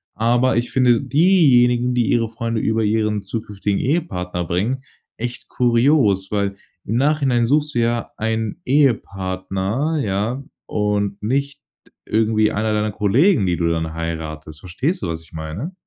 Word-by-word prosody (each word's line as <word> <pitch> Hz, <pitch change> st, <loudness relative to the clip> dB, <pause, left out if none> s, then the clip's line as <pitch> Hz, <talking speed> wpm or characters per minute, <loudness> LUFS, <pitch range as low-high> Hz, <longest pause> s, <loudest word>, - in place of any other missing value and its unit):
aber 120 Hz, +3 st, +2 dB
ich 120 Hz, +1 st, -1 dB
finde 125 Hz, -3 st, +4 dB
diejenigen, 125 Hz, -8 st, +4 dB
die 120 Hz, -3 st, +2 dB
ihre 115 Hz, -2 st, +1 dB
Freunde 115 Hz, 0 st, -3 dB
über 110 Hz, 0 st, +1 dB
ihren 105 Hz, -1 st, 0 dB
zukünftigen 100 Hz, -1 st, -3 dB
Ehepartner 90 Hz, -, -2 dB
bringen, 110 Hz, +11 st, -1 dB, 0.3 s
echt 120 Hz, +1 st, -5 dB
kurios, 120 Hz, -5 st, +2 dB
weil 100 Hz, -1 st, -1 dB, 0.3 s
im 110 Hz, -, -2 dB
Nachhinein 135 Hz, -4 st, +2 dB
suchst 150 Hz, +3 st, +1 dB
du -, -, +2 dB
ja 115 Hz, 0 st, 0 dB
einen 110 Hz, -1 st, -2 dB
Ehepartner, 105 Hz, +1 st, 0 dB
ja? 105 Hz, +7 st, -2 dB, 0.2 s
Und 105 Hz, -1 st, -1 dB
nicht 140 Hz, +5 st, -1 dB, 0.5 s
irgendwie 110 Hz, -1 st, +2 dB
einer 110 Hz, +1 st, -1 dB
deiner 105 Hz, 0 st, 0 dB
Kollegen 110 Hz, -, +3 dB
die 90 Hz, -2 st, 0 dB
du 85 Hz, -, 0 dB
dann 80 Hz, -1 st, -2 dB
heiratest. 80 Hz, -2 st, -5 dB
Verstehst 130 Hz, -, -2 dB
du, -, -, -1 dB
was 80 Hz, -1 st, -4 dB
ich 80 Hz, -, -21 dB
meine? 80 Hz, -, -5 dB
110 Hz, 145 wpm, -20 LUFS, 95-125 Hz, 0.5 s, finde